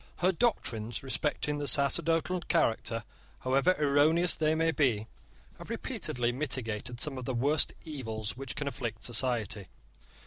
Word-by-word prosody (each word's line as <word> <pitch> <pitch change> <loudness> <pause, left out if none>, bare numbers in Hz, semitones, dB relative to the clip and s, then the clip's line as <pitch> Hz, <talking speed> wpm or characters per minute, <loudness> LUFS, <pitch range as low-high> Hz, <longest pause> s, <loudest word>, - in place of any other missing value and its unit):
Her 185 +1 +3
doctrines 120 - -1
respecting 145 +2 -1
the 145 - -2
sacerdotal 165 +6 +2
character, 115 -6 +1 0.4
however 135 +7 +3
erroneous 150 +4 +4
they 155 0 +2
may 165 0 +2
be, 125 -9 +1 0.5
have - - -10
repeatedly 120 -1 -2
mitigated 120 -4 -3
some 135 -1 -1
of 125 - -6
the 130 - -2
worst 145 +5 +2
evils 110 -8 -4
which 135 +1 -7
can 145 +1 -3
afflict 115 -4 -4
society. 115 -5 0
135 Hz, 135 wpm, -30 LUFS, 120-155 Hz, 0.5 s, erroneous